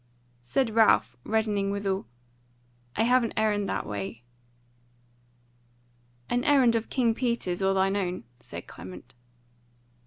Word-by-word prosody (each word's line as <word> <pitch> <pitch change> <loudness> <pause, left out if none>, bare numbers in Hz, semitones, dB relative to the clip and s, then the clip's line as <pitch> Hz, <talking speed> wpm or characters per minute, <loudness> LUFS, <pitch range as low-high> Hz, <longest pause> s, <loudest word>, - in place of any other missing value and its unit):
Said 225 - 0
Ralph, 220 0 +4
reddening 210 -3 0
withal: 195 - -2 0.9
"I 220 - +2
have 250 +1 +4
an 230 - -2
errand 210 -2 +1
that - - -2
way." 105 +3 -5 2.0
"An 245 0 0
errand 265 -5 +5
of 225 0 -1
King 235 -3 +2
Peter's 235 -7 -1
or 195 0 +2
thine 195 +1 +2
own?" 185 -5 -2 0.2
said - - -9
Clement. 90 -1 -11
205 Hz, 120 wpm, -27 LUFS, 190-230 Hz, 2.0 s, errand